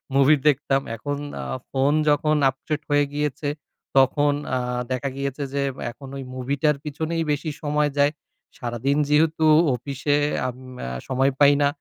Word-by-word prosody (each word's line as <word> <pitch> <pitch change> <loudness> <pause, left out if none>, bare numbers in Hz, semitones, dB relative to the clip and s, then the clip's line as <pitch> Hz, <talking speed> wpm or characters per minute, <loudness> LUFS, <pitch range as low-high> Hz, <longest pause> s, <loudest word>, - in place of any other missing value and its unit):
Movie 140 +2 +6
দেখতাম। 135 -1 +2
এখন 145 +5 -3 0.3
আ - - -5 0.3
phone 135 +2 +2 0.2
যখন 150 +1 +3
আপডেট 150 +3 -4
হয়ে 145 0 +3
গিয়েছে, 145 0 -2 0.5
তখন 145 +2 +4 0.2
আ - - +2 0.3
দেখা 130 +2 -1
গিয়েছে 140 +1 -3
যে, 140 - 0 0.3
এখন 135 +2 -12
ওই 135 - -5
মুভিটার 140 +4 +1
পিছনেই 160 +3 -2
বেশি 150 +2 -1
সময় 150 0 +1
যায়। 145 +1 +4 0.5
সারাদিন 125 +4 -1
যেহেতু 155 +1 +3 0.3
অফিসে, 140 +3 -1 0.3
আম 125 - -4 0.3
আ - - -3 0.2
সময় 135 +1 +2
পাই 145 0 +7
না। 140 - +5
145 Hz, 145 wpm, -23 LUFS, 135-150 Hz, 0.5 s, পাই